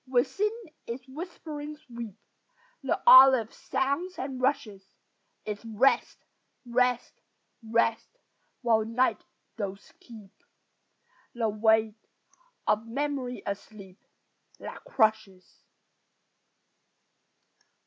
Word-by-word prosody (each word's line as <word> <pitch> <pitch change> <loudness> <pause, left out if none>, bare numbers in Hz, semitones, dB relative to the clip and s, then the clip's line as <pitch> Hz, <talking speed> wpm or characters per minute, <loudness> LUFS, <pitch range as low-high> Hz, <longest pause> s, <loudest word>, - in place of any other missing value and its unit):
Within 260 +12 +1 0.4
its 245 +2 -6
whispering 300 0 -7
sweep 235 -8 -9 0.7
The 270 - -1
olive 260 -4 +8
sounds 280 +8 -2
and 260 -1 -5
rushes; 220 -7 -1 0.6
It's 210 0 -5
"rest, 230 +4 +1 0.4
rest, 245 0 0 0.4
rest," 230 - 0 0.5
while 225 -2 +3
night 230 +4 0 0.3
doth 200 -2 -6
keep 215 -5 -13 1.0
The 230 -2 0
weight 220 0 +2 0.6
of 215 +2 +1
memory 265 0 -3
asleep 200 -1 -8 0.5
That - - -9
crushes. 215 -5 0
235 Hz, 80 wpm, -28 LUFS, 215-265 Hz, 1.0 s, olive